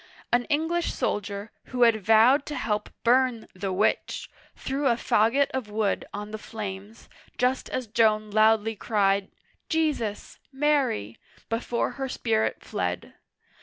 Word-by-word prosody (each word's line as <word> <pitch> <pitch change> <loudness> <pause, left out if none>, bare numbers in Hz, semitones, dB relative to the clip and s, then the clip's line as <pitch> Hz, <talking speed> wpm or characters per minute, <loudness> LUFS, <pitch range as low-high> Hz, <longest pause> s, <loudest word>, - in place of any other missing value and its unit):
An 245 0 +3
English 320 +3 0
soldier, 205 +1 -3
who 250 -1 +1
had 225 -3 +4
vowed 225 +7 +5
to 295 - -4
help 210 -1 -2
bum 245 -1 +3
" - - -46
the 190 +1 -4
witch," 195 +4 0 0.2
threw 275 +1 -2
a 240 - +4
fagot 230 +4 +2
of 260 -5 -4
wood 210 -1 -1
on 210 +1 -6
the 215 - -5
flames, 210 0 -7 0.3
just 255 +1 0
as 255 -1 -3
Joan 215 -1 +2
loudly 220 +1 +3
cried, 200 -2 +1 0.4
"Jesus! 300 -10 -1
Mary!*' 265 - 0 0.3
before 235 +1 -1
her 265 - -1
spirit 220 -3 -1
fled. - - -3
225 Hz, 135 wpm, -26 LUFS, 210-255 Hz, 0.4 s, vowed